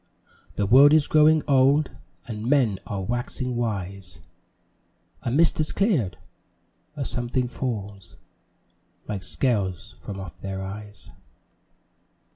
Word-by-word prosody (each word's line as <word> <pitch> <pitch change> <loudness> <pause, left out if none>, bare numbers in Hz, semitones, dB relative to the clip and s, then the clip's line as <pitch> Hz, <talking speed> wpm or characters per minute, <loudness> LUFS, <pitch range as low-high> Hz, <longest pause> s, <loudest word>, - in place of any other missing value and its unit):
The 105 - 0
world 135 +8 +7
is 155 -2 +5
growing 155 0 +4
old, 140 +1 +4 0.4
And 110 0 -4
men 125 -9 +3
are 100 -2 -3
waxing 120 +3 -3
wise; 100 -5 -4 1.0
A - - -3
mist 160 +7 +3
has 155 - 0
cleared 165 - +1 0.8
a 140 -3 -3
something 120 +1 -2
falls 105 -6 -5 0.9
Like 100 -3 -4
scales 100 -7 -1
from 100 -1 -7
off 95 -3 -9
their 95 0 -4
eyes. 105 +1 -9
120 Hz, 110 wpm, -25 LUFS, 100-135 Hz, 1.0 s, world